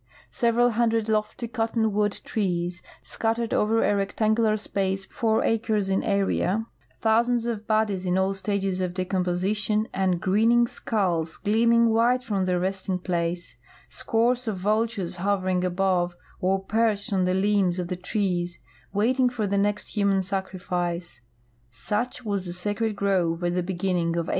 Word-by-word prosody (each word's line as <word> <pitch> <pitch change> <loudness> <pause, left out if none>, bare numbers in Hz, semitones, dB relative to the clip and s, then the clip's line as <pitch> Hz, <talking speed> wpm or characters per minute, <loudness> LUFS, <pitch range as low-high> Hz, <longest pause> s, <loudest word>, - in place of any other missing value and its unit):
Several 240 +1 +2
hundred 225 -1 +1
lofty 215 +2 -1
cottonwood 220 -3 0
trees, 175 -4 -2 0.2
scattered 230 0 -2
over 225 +2 +2
a 205 - +2
rectangular 215 +2 +1
space 195 -2 -2
four 220 +1 0
acres 215 -3 0
in 190 - +2
area, 200 +1 0 0.4
thou 220 0 +4
sands 240 -1 0
of 220 -3 -3
bodies 215 -4 +1
in 180 0 0
all 190 +1 +1
stages 195 -1 -1
of 180 -1 -2
de 185 -1 -1
com))osition 190 +4 0
and 185 -2 +1
grinning 225 +6 +3
skulls 180 -10 -1
gleaming 230 +2 +3
white 240 +3 +3
from 200 -5 -1
their 180 -1 +1
resting 190 0 -1
place, 175 -3 -3 0.3
scores 235 - +1
of 210 -3 -1
vultures 205 -2 -1
hovering 185 -1 0
above 180 -1 +1 0.2
or 190 +1 +1
perched 215 0 0
on 185 -1 +2
the 185 0 +1
limbs 195 -2 +2
of 180 -1 -2
the 180 - -3
trees 180 -2 -2 0.3
waiting 250 +6 +2
for 240 -4 -2
the 200 0 -1
next 205 +2 0
human 200 -2 +2
sacrifice 180 - -3 0.3
— 120 0 -38 0.2
such 240 +3 -1
was 200 -3 -2
the 175 - -4
Sacred 205 +4 -1
Grove 185 -4 0
at 175 0 +1
the 180 - +1
beginning 175 -2 -1
of 170 -1 -1
1896. - - -7
200 Hz, 155 wpm, -25 LUFS, 180-220 Hz, 0.4 s, thou